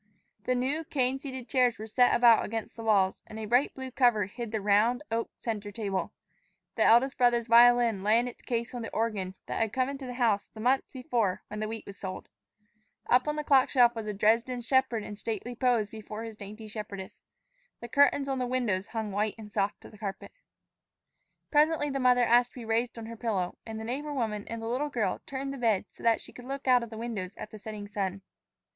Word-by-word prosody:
The 255 Hz, -, +1 dB
new 270 Hz, +6 st, -1 dB
cane 270 Hz, -4 st, 0 dB
seated 260 Hz, -3 st, -7 dB
chairs 250 Hz, 0 st, +2 dB
were 215 Hz, -, -6 dB
set 245 Hz, +3 st, +3 dB
about 235 Hz, -2 st, +6 dB
against 225 Hz, 0 st, -5 dB
the 230 Hz, -, -8 dB
walls, 195 Hz, -4 st, +2 dB
and 215 Hz, -, -9 dB
a 220 Hz, -, -4 dB
bright 245 Hz, +6 st, +3 dB
blue 260 Hz, -1 st, -6 dB
cover 240 Hz, -6 st, +3 dB
hid 230 Hz, +3 st, -7 dB
the 220 Hz, -, -1 dB
round, 210 Hz, +6 st, +3 dB
oak 230 Hz, 0 st, -1 dB
center 210 Hz, -3 st, -4 dB
table. 200 Hz, -3 st, -2 dB, 0.6 s
The -, -, +1 dB
eldest 255 Hz, +4 st, +4 dB
brother's 240 Hz, -1 st, +3 dB
violin 235 Hz, -2 st, +6 dB
lay 210 Hz, +3 st, +4 dB
in 240 Hz, +1 st, +1 dB
its 245 Hz, -, -9 dB
case 235 Hz, 0 st, -3 dB
on 245 Hz, -, -4 dB
the 225 Hz, -, -5 dB
organ 205 Hz, -5 st, -1 dB
that -, -, -3 dB
had 225 Hz, -2 st, +1 dB
come 255 Hz, +2 st, 0 dB
into 275 Hz, -1 st, -6 dB
the 245 Hz, -, -6 dB
house 225 Hz, -5 st, +1 dB
the 220 Hz, -, -14 dB
month 255 Hz, +4 st, +2 dB
before 235 Hz, -7 st, -1 dB
when 210 Hz, -, -5 dB
the 215 Hz, -, -2 dB
wheat 225 Hz, 0 st, -6 dB
was 200 Hz, -, -10 dB
sold. 190 Hz, -2 st, -6 dB, 0.8 s
Up 250 Hz, +4 st, +4 dB
on 300 Hz, -, 0 dB
the 300 Hz, -, -2 dB
clock 270 Hz, -3 st, +4 dB
shelf 245 Hz, -3 st, +5 dB
was 225 Hz, -2 st, -5 dB
a 210 Hz, -, -2 dB
Dresden 230 Hz, +4 st, +2 dB
shepherd 250 Hz, -2 st, +1 dB
in 210 Hz, -, -7 dB
stately 225 Hz, +3 st, -4 dB
pose 240 Hz, -4 st, +2 dB
before 215 Hz, +1 st, -8 dB
his 225 Hz, -1 st, -7 dB
dainty 210 Hz, +1 st, -9 dB
shepherdess. 205 Hz, -3 st, -7 dB, 0.6 s
The 235 Hz, -, -7 dB
curtains 280 Hz, +2 st, +3 dB
on 270 Hz, -1 st, -1 dB
the 250 Hz, -, -1 dB
windows 230 Hz, -7 st, -1 dB
hung 220 Hz, -3 st, -4 dB
white 210 Hz, +2 st, -1 dB
and 210 Hz, -2 st, -11 dB
soft 200 Hz, +1 st, -1 dB
to -, -, -13 dB
the 210 Hz, -, -16 dB
carpet. 195 Hz, -3 st, -6 dB, 1.2 s
Presently 300 Hz, -1 st, +3 dB
the 275 Hz, -, -2 dB
mother 250 Hz, -1 st, +4 dB
asked 240 Hz, +1 st, +4 dB
to -, -, -10 dB
be -, -, -8 dB
raised 230 Hz, +2 st, 0 dB
on 230 Hz, -, -6 dB
her 230 Hz, +1 st, -7 dB
pillow, 210 Hz, -6 st, -2 dB
and 220 Hz, 0 st, -5 dB
the -, -, -6 dB
neighbor 285 Hz, +6 st, -4 dB
woman 215 Hz, -5 st, -2 dB
and 230 Hz, 0 st, -5 dB
the -, -, -3 dB
little 260 Hz, +6 st, -1 dB
girl 225 Hz, -9 st, -1 dB
turned 275 Hz, 0 st, -4 dB
the 275 Hz, -, -7 dB
bed 220 Hz, -5 st, +2 dB
so -, -, -17 dB
that 230 Hz, -1 st, +3 dB
she -, -, -10 dB
could 245 Hz, -, -11 dB
look 275 Hz, +1 st, -6 dB
out 250 Hz, -1 st, +6 dB
of 235 Hz, -, -6 dB
the 220 Hz, -, -8 dB
windows 220 Hz, -5 st, -5 dB
at 215 Hz, -, -8 dB
the 215 Hz, -, -10 dB
setting 210 Hz, -1 st, -7 dB
sun. 195 Hz, -2 st, -3 dB
230 Hz, 225 wpm, -29 LUFS, 215-250 Hz, 1.2 s, about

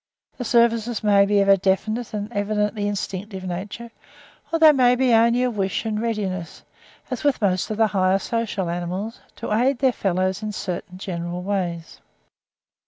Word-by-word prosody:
The 245 Hz, -, -3 dB
services 235 Hz, -1 st, +2 dB
may 200 Hz, -1 st, +5 dB
be 205 Hz, 0 st, +3 dB
of 195 Hz, -, +1 dB
a 195 Hz, 0 st, +6 dB
definite 215 Hz, +5 st, -1 dB
and 210 Hz, +2 st, -5 dB
evidently 210 Hz, 0 st, -1 dB
instinctive 195 Hz, -1 st, -4 dB
nature; 200 Hz, +6 st, -6 dB, 0.6 s
or 330 Hz, -, +2 dB
there 315 Hz, -2 st, +7 dB
may 250 Hz, -2 st, +4 dB
be 255 Hz, -1 st, +2 dB
only 235 Hz, +2 st, +4 dB
a 250 Hz, -, +1 dB
wish 195 Hz, 0 st, -2 dB
and 215 Hz, -1 st, -1 dB
readiness, 195 Hz, -7 st, -3 dB, 0.5 s
as 255 Hz, -, -3 dB
with 285 Hz, -2 st, +2 dB
most 185 Hz, -4 st, 0 dB
of 215 Hz, -, -3 dB
the 220 Hz, -, +4 dB
higher 190 Hz, -2 st, +2 dB
social 215 Hz, -3 st, -2 dB
animals, 180 Hz, +6 st, -4 dB, 0.2 s
to -, -, -4 dB
aid 250 Hz, +5 st, +2 dB
their 265 Hz, 0 st, +3 dB
fellows 185 Hz, 0 st, -1 dB
in 215 Hz, -1 st, -4 dB
certain 180 Hz, -1 st, -5 dB
general 175 Hz, -1 st, -5 dB
ways. 180 Hz, -4 st, -3 dB
205 Hz, 170 wpm, -23 LUFS, 190-230 Hz, 0.6 s, there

